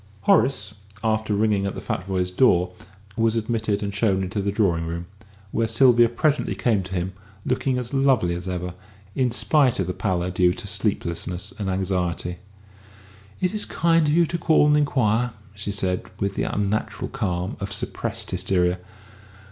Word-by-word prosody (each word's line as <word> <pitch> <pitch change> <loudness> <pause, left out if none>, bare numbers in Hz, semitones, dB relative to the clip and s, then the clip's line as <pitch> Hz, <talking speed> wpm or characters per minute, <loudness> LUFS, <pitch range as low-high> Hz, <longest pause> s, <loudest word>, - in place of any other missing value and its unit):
Horace, 105 -1 +2 0.3
after 110 -1 +1
ringing 105 -2 +2
at 100 - -4
the - - -5
Futvoyes' 90 -1 -2
door, 90 -8 +4 0.4
was 115 -1 +2
admitted 110 -2 -1
and 100 0 -3
shown 100 -2 +1
into 95 +3 -2
the 100 +1 -1
drawing 90 -6 +1
room, 85 +1 -4 0.5
where 115 0 +1
Sylvia 120 0 +5
presently 150 +5 0
came 110 -5 +1
to 95 0 -6
him, 90 +2 -2 0.3
looking 130 0 0
as 125 +1 -4
lovely 135 -10 +3
as 90 +2 -5
ever, 90 -1 -3 0.4
in 130 +1 +1
spite 130 +1 +2
of - - +1
the 90 - -3
pallor 90 -3 -1
due 90 0 +3
to - - -7
sleeplessness 90 +3 -2
and 100 -2 -2
anxiety. 90 -2 -1 1.0
"It 180 +2 +1
is 210 - 0
kind 165 -2 +2
of - - +2
you 170 +1 +5
to 170 +1 -3
call 160 -2 +4
and 150 0 +4
inquire," 125 -5 +2 0.2
she 100 0 -4
said, 95 -2 -1
with 100 0 -1
the - - -1
unnatural 105 0 -1
calm 95 -8 -2
of 100 0 -4
suppressed - - -3
hysteria. 90 -1 +1
100 Hz, 165 wpm, -24 LUFS, 90-120 Hz, 1.0 s, Sylvia